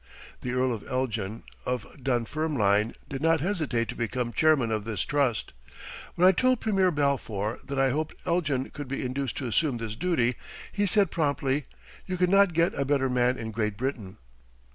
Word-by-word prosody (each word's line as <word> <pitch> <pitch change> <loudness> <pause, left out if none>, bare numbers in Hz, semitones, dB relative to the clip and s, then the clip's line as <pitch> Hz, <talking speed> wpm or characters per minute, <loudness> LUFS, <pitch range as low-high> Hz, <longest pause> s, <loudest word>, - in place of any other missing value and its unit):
The 125 - -3
Earl 125 0 +2
of 110 - -6
Elgin, 115 -5 -2 0.2
of 125 0 -2 0.2
Dunfermline, 120 -4 +1
did 135 0 -5
not 165 0 +3
hesitate 155 - -1
to - - -4
become 120 +1 -2
Chairman 150 -8 +3
of 110 -1 -1
this 105 -4 -3
trust. 140 - 0 0.6
When 180 +2 +5
I - - +9
told 255 +6 +2
Premier 195 -4 +2
Balfour 130 - -1
that 140 - -5
I 135 -1 +3
hoped 155 +3 -2
Elgin 155 -7 0
could 145 -2 -7
be 140 0 -3
induced 130 0 -3
to 135 - -3
assume 130 +2 +1
this 115 -2 -5
duty, 125 -6 +1 0.3
he 205 0 0
said 200 +1 +3
promptly, 140 -3 0 0.4
"You 185 -1 -2
could 180 0 +2
not 195 -2 +5
get 170 +2 +2
a 140 - -1
better 135 -2 +1
man 125 0 +2
in 110 0 -5
Great 105 -2 -1
Britain." 115 -6 -4
135 Hz, 180 wpm, -27 LUFS, 115-160 Hz, 0.6 s, I